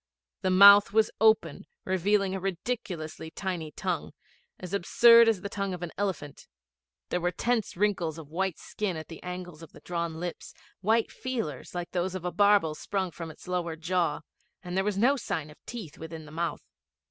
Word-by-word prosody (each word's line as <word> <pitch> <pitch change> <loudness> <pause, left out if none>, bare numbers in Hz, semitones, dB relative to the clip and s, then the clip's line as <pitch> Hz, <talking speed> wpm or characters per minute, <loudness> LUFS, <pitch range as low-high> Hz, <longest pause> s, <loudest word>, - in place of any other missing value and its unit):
The 190 - +1
mouth 200 +2 +8
was 220 0 +3
open, 220 -1 +3 0.2
revealing 190 +1 +1
a 190 - -2
ridiculously 180 -5 -4
tiny 175 -3 -4
tongue - - -3 0.5
as 180 +1 -8
absurd 230 +4 +6
as 210 -5 0
the 200 - -4
tongue 200 -2 -3
of 180 - -8
an 170 - -5
elephant; 170 -8 -4 0.6
there 180 - -1
were 175 - +1
tense 225 +2 -1
wrinkles 185 -6 0
of 155 -2 -11
white 185 0 -1
skin 195 -5 -4
at 155 - -8
the 165 - -9
angles 180 -3 -7
of 165 - -12
the - - -13
drawn 170 -2 -3
lips, 175 0 -6 0.2
white 220 +4 +2
feelers 225 - -5
like 175 -1 -4
those 185 +1 -1
of 180 -2 -5
a 180 - -1
barbel 200 -4 +4
sprung 190 +3 -3
from 165 0 -7
the 160 +3 -10
lower 170 -2 -1
jaw, 165 -2 0 0.4
and 180 0 -5
there 190 - +2
was 205 -1 -1
no 260 +7 +4
sign 155 - -4
of 150 - -19
teeth 200 -11 -8
within 160 -1 -8
the 150 - -12
mouth. 165 +2 -3
180 Hz, 185 wpm, -28 LUFS, 165-200 Hz, 0.6 s, mouth